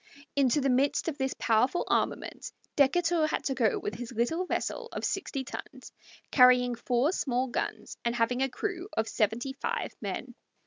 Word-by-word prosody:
Into 280 Hz, 0 st, +3 dB
the 275 Hz, -, +2 dB
midst 270 Hz, +6 st, +2 dB
of 295 Hz, -, -6 dB
this 265 Hz, 0 st, -1 dB
powerful 250 Hz, +9 st, +2 dB
armament -, -, -1 dB, 0.2 s
Decatur 325 Hz, +3 st, +3 dB
had -, -, -2 dB
to 270 Hz, -, 0 dB
go 235 Hz, -5 st, +2 dB
with 205 Hz, -, -4 dB
his 235 Hz, +3 st, -6 dB
little 285 Hz, +11 st, 0 dB
vessel -, -, -2 dB
of -, -, -3 dB
sixty 315 Hz, -8 st, -2 dB
tons, 260 Hz, -, -9 dB, 0.4 s
carrying 250 Hz, -1 st, +6 dB
four 245 Hz, +5 st, +1 dB
small 255 Hz, -8 st, 0 dB
guns 245 Hz, -, -4 dB
and 235 Hz, 0 st, 0 dB
having 240 Hz, +2 st, +1 dB
a 270 Hz, -, +2 dB
crew 375 Hz, +6 st, -4 dB
of 220 Hz, 0 st, +1 dB
seventy 225 Hz, +6 st, 0 dB
five 465 Hz, -, -3 dB
men. -, -, -4 dB
265 Hz, 170 wpm, -29 LUFS, 240-300 Hz, 0.4 s, carrying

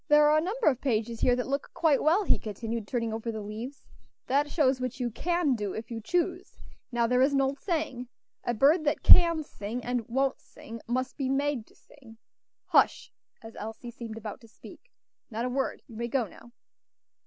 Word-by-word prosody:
"There 295 Hz, 0 st, +6 dB
are 305 Hz, -, +5 dB
a -, -, 0 dB
number 430 Hz, +8 st, -2 dB
of 265 Hz, -4 st, +3 dB
pages 230 Hz, -3 st, -1 dB
here 245 Hz, -, +4 dB
that 250 Hz, -, -2 dB
look 275 Hz, +1 st, -2 dB
quite 310 Hz, -5 st, +3 dB
well," 340 Hz, +7 st, +3 dB
he -, -, +2 dB
continued, 220 Hz, +1 st, -5 dB
turning 230 Hz, -2 st, -2 dB
over 225 Hz, +1 st, -3 dB
the 220 Hz, -, -5 dB
leaves; 220 Hz, +6 st, -7 dB, 0.4 s
"that 285 Hz, +3 st, +1 dB
shows 270 Hz, -5 st, +2 dB
what 255 Hz, +1 st, -3 dB
you 245 Hz, -1 st, -1 dB
can 345 Hz, +3 st, +1 dB
do, 210 Hz, -5 st, -3 dB
if 220 Hz, +2 st, -7 dB
you 225 Hz, -1 st, -4 dB
choose; 355 Hz, -, -1 dB, 0.4 s
now 240 Hz, -1 st, +2 dB
there 250 Hz, +2 st, +2 dB
is 275 Hz, +2 st, +4 dB
an 275 Hz, -, +3 dB
old 270 Hz, +1 st, -1 dB
saying, 305 Hz, -9 st, -2 dB, 0.4 s
'A 240 Hz, -, -1 dB
bird 300 Hz, +8 st, +4 dB
that 295 Hz, +1 st, 0 dB
can 335 Hz, -3 st, +7 dB
sing, 230 Hz, -1 st, -6 dB
and 245 Hz, -1 st, -1 dB
won't 265 Hz, +3 st, 0 dB
sing, 230 Hz, 0 st, -11 dB
must 255 Hz, +2 st, -2 dB
be 270 Hz, -3 st, -1 dB
made 275 Hz, -4 st, 0 dB
to -, -, -23 dB
sing.' 235 Hz, -6 st, -18 dB, 0.5 s
Hush!" -, -, +2 dB, 0.3 s
as 225 Hz, 0 st, -11 dB
Elsie 225 Hz, +3 st, -7 dB
seemed 230 Hz, -2 st, -8 dB
about 220 Hz, +3 st, -7 dB
to 230 Hz, -, -15 dB
speak; -, -, -15 dB, 0.4 s
"not 230 Hz, +1 st, -3 dB
a -, -, -1 dB
word. 265 Hz, +1 st, -2 dB
You 225 Hz, -, -12 dB
may 235 Hz, +1 st, -2 dB
go 245 Hz, 0 st, 0 dB
now." 230 Hz, +4 st, -15 dB
250 Hz, 205 wpm, -28 LUFS, 230-290 Hz, 0.5 s, can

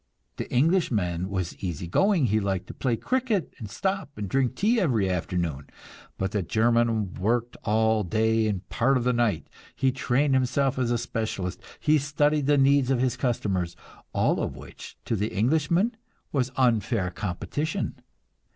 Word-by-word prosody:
The -, -, -5 dB
Englishman 115 Hz, -, +1 dB
was 95 Hz, -3 st, -3 dB
easy 90 Hz, -3 st, -4 dB
going; 185 Hz, -, +3 dB
he 110 Hz, -1 st, +2 dB
liked 95 Hz, -3 st, -2 dB
to -, -, -9 dB
play 125 Hz, -3 st, 0 dB
cricket, 250 Hz, -, -1 dB
and 110 Hz, -4 st, -7 dB
stop 195 Hz, -, -2 dB
and 105 Hz, -1 st, -3 dB
drink 130 Hz, +4 st, 0 dB
tea 230 Hz, +4 st, +2 dB
every 115 Hz, -, +2 dB
afternoon. 85 Hz, -6 st, -2 dB, 0.5 s
But 95 Hz, 0 st, -2 dB
the 105 Hz, -, 0 dB
German 115 Hz, 0 st, +1 dB
worked 120 Hz, +5 st, -1 dB
all 110 Hz, 0 st, +2 dB
day 110 Hz, +3 st, +1 dB
and 100 Hz, -2 st, -3 dB
part 135 Hz, +3 st, +2 dB
of 125 Hz, -, -1 dB
the 125 Hz, +1 st, +2 dB
night; 115 Hz, -8 st, +1 dB, 0.3 s
he 135 Hz, -1 st, +2 dB
trained 135 Hz, +2 st, +1 dB
himself 130 Hz, +1 st, +1 dB
as 125 Hz, -2 st, +1 dB
a 120 Hz, -, +2 dB
specialist, 110 Hz, -6 st, -3 dB, 0.2 s
he 155 Hz, 0 st, +3 dB
studied 145 Hz, +1 st, +1 dB
the 145 Hz, 0 st, +4 dB
needs 135 Hz, -1 st, +4 dB
of 135 Hz, -2 st, +2 dB
his 130 Hz, -1 st, +1 dB
customers 95 Hz, -9 st, -1 dB, 0.4 s
all -, -, +1 dB
of -, -, -3 dB
which -, -, -11 dB
to 115 Hz, -, 0 dB
the 105 Hz, +1 st, -1 dB
Englishman 160 Hz, -, +1 dB, 0.4 s
was 130 Hz, -3 st, 0 dB
"unfair" 115 Hz, -6 st, +2 dB
competition. 105 Hz, -, -3 dB
120 Hz, 160 wpm, -26 LUFS, 100-140 Hz, 0.5 s, the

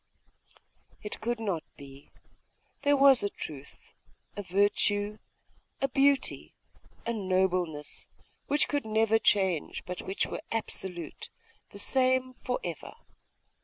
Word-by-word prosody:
It 210 Hz, -, -6 dB
could 240 Hz, +1 st, -1 dB
not 195 Hz, -8 st, -2 dB
be! 140 Hz, 0 st, -13 dB, 0.7 s
There 285 Hz, 0 st, +4 dB
was 275 Hz, -2 st, +7 dB
a 205 Hz, -, 0 dB
truth, 140 Hz, -7 st, -9 dB, 0.4 s
a 205 Hz, -, -3 dB
virtue, 205 Hz, +2 st, +1 dB, 0.6 s
a 275 Hz, -, +2 dB
beauty, 275 Hz, +1 st, +2 dB, 0.5 s
a 235 Hz, -, 0 dB
nobleness, 185 Hz, -6 st, 0 dB, 0.4 s
which 290 Hz, +1 st, +3 dB
could 290 Hz, -2 st, 0 dB
never 220 Hz, 0 st, +3 dB
change, 190 Hz, -7 st, +1 dB
but 180 Hz, 0 st, -5 dB
which 190 Hz, -, -1 dB
were -, -, -5 dB
absolute, 185 Hz, -7 st, -2 dB, 0.4 s
the -, -, -11 dB
same 255 Hz, +3 st, +2 dB
for 250 Hz, -, -1 dB
ever. 170 Hz, -4 st, -6 dB
205 Hz, 115 wpm, -29 LUFS, 180-250 Hz, 0.7 s, was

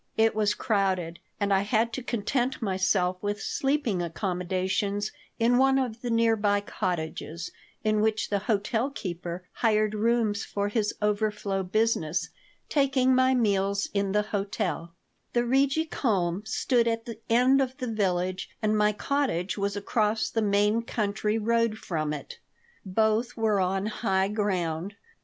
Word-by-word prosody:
lt 225 Hz, 0 st, +4 dB
was 210 Hz, -1 st, +1 dB
crowded, 190 Hz, -6 st, 0 dB, 0.2 s
and 200 Hz, -1 st, +1 dB
I 195 Hz, -, +4 dB
had 225 Hz, +3 st, +1 dB
to 260 Hz, -, -3 dB
content 245 Hz, +2 st, -1 dB
myself 185 Hz, -3 st, +1 dB
with 205 Hz, 0 st, -2 dB
sleeping 270 Hz, -9 st, 0 dB
accommodations 185 Hz, +3 st, -1 dB, 0.3 s
in 240 Hz, +2 st, +3 dB
one 270 Hz, 0 st, +4 dB
of 245 Hz, -4 st, -2 dB
the 245 Hz, -, -3 dB
near 230 Hz, -1 st, +3 dB
by 205 Hz, -1 st, +2 dB
cottages, 165 Hz, -4 st, -4 dB, 0.3 s
in 215 Hz, -1 st, +2 dB
which 220 Hz, 0 st, 0 dB
the 200 Hz, -, +2 dB
hotel 220 Hz, +4 st, +1 dB
keeper 180 Hz, -6 st, -6 dB
hired 215 Hz, -2 st, +1 dB
rooms 220 Hz, -1 st, +1 dB
for 200 Hz, 0 st, -2 dB
his 210 Hz, -1 st, 0 dB
overflow 210 Hz, -2 st, 0 dB
business, 190 Hz, -4 st, 0 dB, 0.4 s
taking 270 Hz, -3 st, +3 dB
my 260 Hz, 0 st, +4 dB
meals 200 Hz, -3 st, +1 dB
in 200 Hz, -1 st, 0 dB
the 210 Hz, +1 st, +2 dB
hotel 195 Hz, -5 st, -3 dB, 0.4 s
The 240 Hz, 0 st, +2 dB
Rigi 275 Hz, +5 st, +2 dB
Kulm 195 Hz, -, 0 dB
stood 235 Hz, +1 st, +1 dB
at 230 Hz, 0 st, -1 dB
the 230 Hz, -2 st, -7 dB
end 255 Hz, +4 st, +5 dB
of 260 Hz, -1 st, -2 dB
the 250 Hz, -3 st, -3 dB
village 185 Hz, -2 st, -1 dB
and 215 Hz, -1 st, +1 dB
my 210 Hz, 0 st, +3 dB
cottage 210 Hz, -7 st, -1 dB
was 200 Hz, -1 st, -1 dB
across 215 Hz, +1 st, 0 dB
the 225 Hz, -, 0 dB
main 210 Hz, +2 st, +2 dB
country 215 Hz, -1 st, -1 dB
road 230 Hz, 0 st, +1 dB
from 155 Hz, -8 st, -2 dB
it. 150 Hz, -2 st, -7 dB, 0.4 s
Both 220 Hz, +4 st, +1 dB
were 220 Hz, -3 st, +2 dB
on 190 Hz, +1 st, 0 dB
high 195 Hz, -3 st, 0 dB
ground. 190 Hz, -3 st, -1 dB
210 Hz, 145 wpm, -27 LUFS, 195-230 Hz, 0.4 s, end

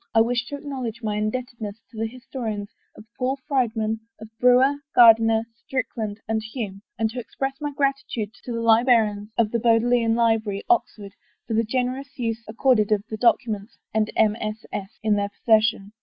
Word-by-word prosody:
I 225 Hz, -, +7 dB
ivish 240 Hz, +1 st, 0 dB
to 285 Hz, -, -5 dB
acknowledge 260 Hz, -6 st, -5 dB
my 210 Hz, -1 st, -1 dB
indebtedness 220 Hz, -1 st, -4 dB
to 225 Hz, -, -13 dB
the 225 Hz, -, 0 dB
his 255 Hz, +2 st, -13 dB
tories 215 Hz, -6 st, -3 dB, 0.3 s
of 215 Hz, -, -12 dB
Paul 260 Hz, +2 st, 0 dB
Friedmann, 225 Hz, -6 st, 0 dB, 0.2 s
of 220 Hz, 0 st, -10 dB
Brewer, 250 Hz, +3 st, +5 dB, 0.2 s
Gairdiner, 225 Hz, -1 st, +7 dB, 0.2 s
Strick 260 Hz, -1 st, -3 dB
land, 215 Hz, -3 st, -4 dB
and 220 Hz, 0 st, 0 dB
Hume, 215 Hz, -3 st, -6 dB, 0.2 s
and 225 Hz, -, +1 dB
to 250 Hz, -, -5 dB
express 270 Hz, +3 st, -4 dB
my 295 Hz, -1 st, -2 dB
gratitude 275 Hz, -6 st, -2 dB
to 245 Hz, -, -6 dB
the 230 Hz, 0 st, -2 dB
librarians 225 Hz, -3 st, +3 dB
of 220 Hz, -2 st, +2 dB
the 235 Hz, -, 0 dB
Bodleian 230 Hz, 0 st, +3 dB
Library, 225 Hz, -3 st, +1 dB
Oxford, 210 Hz, -, 0 dB, 0.3 s
for 230 Hz, -, -4 dB
the 225 Hz, +1 st, +3 dB
gen 250 Hz, +3 st, 0 dB
erous 275 Hz, +4 st, -8 dB
use 230 Hz, -2 st, -2 dB
accorded 220 Hz, -2 st, +2 dB
of 205 Hz, -1 st, +2 dB
the 220 Hz, -, -3 dB
documents 225 Hz, -3 st, +1 dB, 0.2 s
and 215 Hz, 0 st, +1 dB
MSS. 215 Hz, -1 st, -1 dB
in 215 Hz, -1 st, +2 dB
their 200 Hz, 0 st, -1 dB
possession. 215 Hz, -1 st, +2 dB
225 Hz, 175 wpm, -24 LUFS, 215-250 Hz, 0.3 s, I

